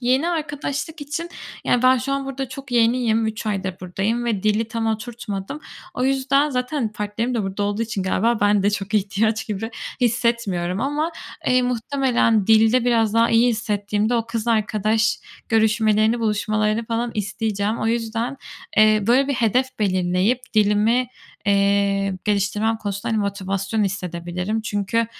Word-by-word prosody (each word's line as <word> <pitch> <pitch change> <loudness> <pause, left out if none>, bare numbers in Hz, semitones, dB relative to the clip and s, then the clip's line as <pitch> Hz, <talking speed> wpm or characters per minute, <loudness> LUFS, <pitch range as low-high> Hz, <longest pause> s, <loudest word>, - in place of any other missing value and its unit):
Yeni 260 +6 +2
arkadaşlık 305 -1 -3
için 330 +4 -4 0.3
yani 245 - +2
ben 255 0 +5
şu 275 +3 -3
an 275 0 -2
burada 270 -1 -4
çok 270 0 -9
yeniyim, 230 -1 +2
3 220 0 -4
aydır 195 -3 -2
buradayım 195 +6 -2
ve 215 -5 -1
dili 215 +1 +1
tam 230 0 -2
oturtmadım. 220 +2 -4 0.3
O 250 - -1
yüzden 270 +2 +2
zaten 250 -2 -2
partnerim 215 +4 -2
de 225 - 0
burada 195 +1 -3
olduğu 205 +2 -1
için 215 -4 -3
galiba 220 +5 +1
ben 205 -1 +3
de 205 - +3
çok 205 +1 -3
ihtiyaç 210 +2 +1
gibi 220 +2 -4 0.3
hissetmiyorum 225 -7 0
ama, 295 +5 -1 0.3
eee, 255 0 +4
muhtemelen 245 -3 +1
dilde 225 +2 +5
biraz 225 -3 +2
daha 230 0 +4
iyi 230 +2 +4
hissettiğimde 210 -1 0
o 230 -1 0
kız 230 0 -3
arkadaş 220 +1 +1 0.3
görüşmelerini, 220 0 +3
buluşmalarını 215 +1 0
falan 235 +1 -1
isteyeceğim. 210 0 -2
O - - -1
yüzden, 230 +3 -1 0.4
eee, 215 -1 +5
böyle 260 +4 +4
bir 280 - +1
hedef 245 +2 +2
belirleyip 185 +3 +1
dilimi, 215 +4 +3 0.4
eee, 200 -1 +2
geliştirmem 210 +2 +1
konusunda, 205 0 -4
hani, 220 - +1
motivasyon 200 +1 -1
hissedebilirim. 180 +2 -3
Çünkü 210 +2 -1
220 Hz, 150 wpm, -22 LUFS, 205-240 Hz, 0.4 s, ben